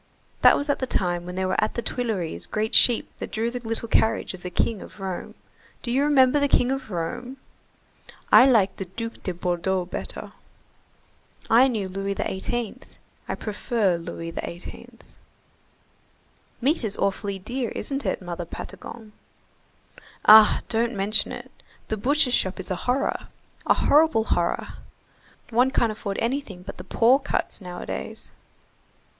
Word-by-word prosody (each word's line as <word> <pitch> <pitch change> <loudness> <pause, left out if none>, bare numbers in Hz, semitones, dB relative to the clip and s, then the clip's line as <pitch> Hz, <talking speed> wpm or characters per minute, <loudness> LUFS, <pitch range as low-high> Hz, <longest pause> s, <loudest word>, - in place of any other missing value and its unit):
That - - +7
was 285 - -1
at 285 - +1
the 260 - -2
time 175 -5 -1
when 180 - -6
there 190 0 -1
were 185 - +1
at - - -1
the 235 - -2
Tuileries 215 -9 -2
great 215 0 -2
sheep 240 -2 +4
that - - -6
drew 225 +2 -1
the 245 - -4
little 230 0 -4
carriage 220 -2 +1
of 185 - -10
the 180 - -5
King 210 +3 -1
of - - -12
Rome. 190 -2 -5 0.5
Do 240 - -2
you 260 +3 +2
remember 285 -1 +5
the 285 - +2
King 250 -2 +3
of 270 -3 -3
Rome?" 245 +9 -4 0.9
"I 260 - +9
liked 210 -7 +3
the 195 - -4
Duc 230 +5 -7
de 185 - -2
Bordeau 180 +1 -1
better." 175 - -6 1.2
"I 245 +4 +7
knew 215 -7 -2
Louis 195 +1 -3
XVIII. 235 +6 -3 0.5
I - - -1
prefer 210 -3 0
Louis 165 0 -6
XVIII." 170 +1 -7 1.7
"Meat 280 +3 +2
is 210 -2 -2
awfully 200 0 -1
dear, 240 +5 -3
isn't 275 0 -3
it, - - -2
Mother 175 -1 -5
Patagon?" 220 +5 -9 1.1
"Ah! 215 0 +8
don't 230 +1 0
mention 205 +2 +1
it, - - -8 0.4
the 220 - -1
butcher's 270 +3 +2
shop 190 -3 +1
is 190 - -6
a - - +1
horror. 255 +2 0 0.4
A - - +5
horrible 295 -7 +4
horror—one 230 +6 -2
can't 235 -4 +1
afford 200 -2 -5
anything 230 -7 -3
but 195 - -8
the - - -8
poor 245 +4 +4
cuts 285 -5 -2
nowadays." 175 - -6
220 Hz, 150 wpm, -25 LUFS, 185-245 Hz, 1.7 s, I